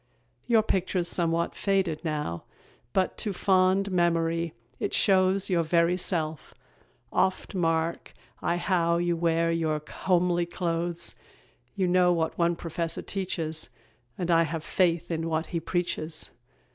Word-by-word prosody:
Your 230 -3 +4
picture's 185 -3 0
somewhat 170 -1 0
faded 190 -6 0
now, 150 - -3 0.5
But 190 -1 0
to 210 -3 -1
fond 190 +1 +3
memory 170 -2 +1 0.2
it - - -1
shows 190 -1 +3
Your 180 -3 +2
very 170 +2 +3
self; 160 -4 -2 0.6
oft 190 - +1
mark 165 -2 -1 0.3
I 175 - 0
how 170 -2 +2
You 175 0 +1
wear 165 0 +1
your 160 -2 0
homely 175 -2 +1
clothes. 170 -1 -2 0.6
You 190 - +1
know 180 0 +4
what 165 -2 0
one 170 0 +2
professor 165 0 -3
teaches, 165 -7 -3 0.5
And 175 -1 -1
I 165 0 +5
have 165 -1 -2
faith 175 -1 +1
in 165 0 -1
what 160 0 0
he 170 - +1
preaches. 165 -2 -3
170 Hz, 135 wpm, -27 LUFS, 165-185 Hz, 0.6 s, I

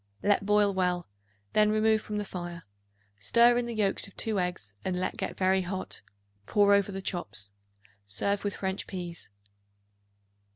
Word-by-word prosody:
Let 205 -1 +2
boil 210 -1 +4
well; 180 -2 0 0.5
then 210 0 +5
remove 215 0 +3
from 210 -1 -4
the 210 - -2
fire; 175 -3 -6 0.6
stir 235 - +5
in 240 - -2
the 235 - -4
yolks 200 -2 +1
of 200 - -18
2 220 -3 0
eggs, 175 - -3
and 185 - -1
let 185 +1 -1
get - - -4
very 190 0 +3
hot; 185 +1 -4 0.5
pour 205 -1 +4
over 200 0 +3
the 195 0 -5
chops. 105 - -2 0.6
Serve 200 - 0
with 205 -1 -1
French 190 0 -3
peas. 175 -3 -6
195 Hz, 160 wpm, -29 LUFS, 180-210 Hz, 0.6 s, then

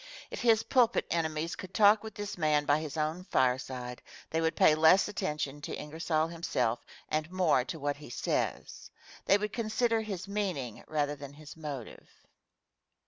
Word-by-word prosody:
If - - -5
his 225 -2 +4
pulpit 245 -3 +3
enemies 160 -1 -1
could 185 +1 -9
talk 210 0 +6
with 220 -1 -8
this 205 -1 -5
man 150 -3 +2
by 145 +1 +3
his 155 0 -6
own 155 +4 -1
fireside, 125 -3 -1 0.3
they 160 - +1
would 160 0 +1
pay 155 - +6
less 160 +5 +5
attention 150 -8 -3
to - - -5
Ingersoll 155 +1 -1
himself 145 -8 -1 0.3
and 155 +1 -1
more 175 -8 +3
to 160 - -5
what 145 -1 -2
he 150 - -11
says. - - -2 0.4
They 200 - +5
would 210 0 -3
consider 230 0 +1
his 200 -4 -5
meaning, 185 - -3
rather 145 -1 0
than 140 -1 -9
his 150 0 -12
motive. 145 -7 -7
160 Hz, 165 wpm, -31 LUFS, 145-200 Hz, 0.4 s, talk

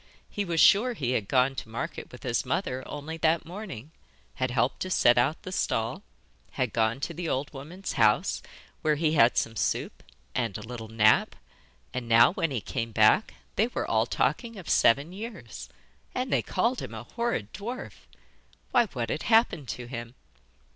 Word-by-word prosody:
He 205 - -2
was 170 -2 -1
sure 230 +9 +6
he 130 - -2
had 110 -6 0
gone 130 +2 +3
to 120 - -7
market 115 - -5
with - - -12
his - - 0
mother 130 +1 -2
only 150 +3 -6
that 165 +1 +2
morning, 165 - -8 0.4
had 130 - -1
helped 120 +1 0
to 185 - -3
set 120 -9 +5
out 130 +6 +1
the 185 - -6
stall, 115 -9 -1 0.5
had 125 -5 -1
gone 115 +2 +1
to - - -3
the 175 -2 -4
old 140 +3 -2
woman's 160 +8 -6
house, - - +3 0.4
where 155 -1 +2
he 155 +1 +1
had 120 -6 +5
some 115 - 0
soup 105 - -2 0.3
and 115 -5 -1
a 105 - -8
little 115 0 -7
nap, 110 -1 +3 0.6
and 125 -2 -4
now, 115 +7 +6
when 180 -5 0
he 130 -6 -2
came 115 +1 -4
back, 110 - +4 0.2
they 220 - +4
were 245 - -3
all - - +2
talking 230 -3 -1
of 185 - -10
seven 140 +9 +4
years. 220 +3 -8 0.5
And 255 0 -1
they - - +3
called 245 +2 0
him - - -7
a - - -6
horrid 235 - -3
dwarf! 235 +6 -7 0.6
Why, 240 -2 +4
what 120 - -4
had - - -2
happened 220 - +3
to 125 +1 -5
him? 120 0 -7
140 Hz, 180 wpm, -28 LUFS, 115-185 Hz, 0.6 s, sure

